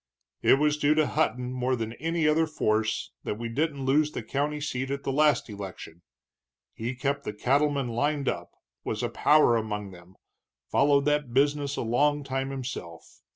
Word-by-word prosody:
"It - - +6
was 150 +1 +1
due 150 +1 +3
to 155 -1 +3
Hutton, 125 -5 0
more 130 0 0
than 115 -1 -4
any 165 +1 0
other 160 +1 +3
force, 110 -7 0
that 105 - -3
we 115 +1 -4
didn't 140 +2 -1
lose 150 +3 +3
the - - -4
county 145 +6 -2
seat 130 -3 -3
at 140 0 -3
the - - -1
last 150 +1 +3
election 95 -5 -9 0.7
he 120 +3 -4
kept 140 +3 -2
the 105 - -4
cattlemen 140 +3 +1
lined 140 +4 -1
up, - - -2 0.3
was - - -3
a - - 0
power 150 -5 +4
among 105 -3 -3
them, 90 +1 -15 0.6
followed 140 0 +3
that 150 -4 0
business 145 0 +2
a - - -2
long 145 +6 +2
time 135 0 -2
himself. 130 -11 -7
135 Hz, 175 wpm, -27 LUFS, 115-150 Hz, 0.7 s, It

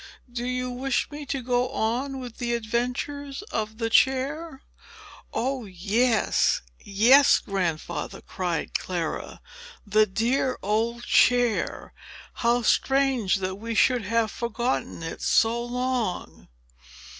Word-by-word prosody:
"Do 240 0 -4
you 250 0 -2
wish 260 +3 -1
me 290 -1 -7
to 265 -1 -3
go 245 0 +1
on 265 +3 -2
with 245 -3 -8
the 240 -1 -1
adventures 250 - -3
of 220 0 -3
the 225 -1 -2
chair?" 270 +4 +1 0.7
"Oh, 255 +1 -2
yes, 210 - +1 0.2
yes, 240 +8 +5
Grandfather!" 175 -4 -3
cried 180 -3 -3
Clara. 175 -3 -3 0.4
"The 215 +1 +3
dear 240 +6 0
old 225 +4 0
chair! 245 -2 +2 0.5
How 240 0 +2
strange 265 -5 +2
that 190 -1 -3
we 230 +2 -5
should 245 -1 +3
have 225 0 +1
forgotten 235 -6 -2
it 165 - -6
so 230 +1 +2
long!" 245 -5 -3
235 Hz, 115 wpm, -25 LUFS, 215-255 Hz, 0.7 s, yes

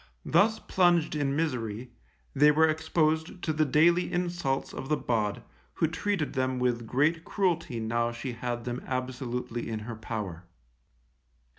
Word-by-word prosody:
Thus 220 +2 +4
plunged 175 -3 +2
in 140 -2 0
misery, 125 -6 -2 0.4
they 145 +2 +6
were 160 +2 +5
exposed 160 +1 0
to 155 - 0
the 155 0 +2
daily 170 +5 +3
insults 175 -6 -1
of 135 - -6
the 150 - +2
bawd, 110 -4 -1 0.3
who - - +2
treated 175 0 -1
them 130 -1 0
with 120 -2 0
great 155 +7 +2
cruelty 170 - -1
now 115 +1 0
she 120 +2 -5
had 120 0 -4
them 120 0 -3
absolutely 125 -2 -3
in 110 -1 -3
her 115 +2 -6
power. 105 -6 -5
135 Hz, 145 wpm, -28 LUFS, 120-160 Hz, 0.4 s, they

